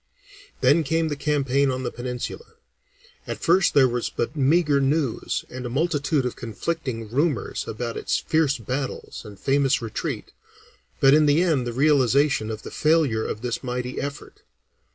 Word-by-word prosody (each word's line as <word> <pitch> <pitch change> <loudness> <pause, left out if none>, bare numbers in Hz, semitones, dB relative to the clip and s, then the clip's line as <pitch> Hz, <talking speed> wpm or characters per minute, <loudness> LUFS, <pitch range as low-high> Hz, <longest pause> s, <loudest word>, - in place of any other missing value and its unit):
Then 145 +6 +5
came 160 +2 0
the 145 - -2
campaign 140 -2 +1
on 130 0 -2
the - - -2
Peninsula. 125 - -6 0.7
At - - -4
first 180 0 +3
there 135 -2 +6
was 120 -1 -2
but 120 +6 -3
meagre 145 0 +3
news 135 -3 -1
and 130 0 -7
a 120 - -4
multitude 145 0 0
of 125 - -3
conflicting 120 0 -4
rumors 145 +2 -1
about 115 +1 -4
its - - 0
fierce 155 -3 +1
battles 130 +4 -5
and 105 -4 -12
famous 135 0 +2
retreat, 115 -2 -4 0.7
but 135 0 +6
in 155 0 +5
the 150 +4 +4
end 145 -9 +1
the - - -2
realization 140 -3 +3
of 110 -1 -6
the - - -8
failure 150 -8 +2
of 105 - -5
this 120 +1 -3
mighty 125 0 -3
effort. 140 0 -7
135 Hz, 160 wpm, -24 LUFS, 125-150 Hz, 0.7 s, there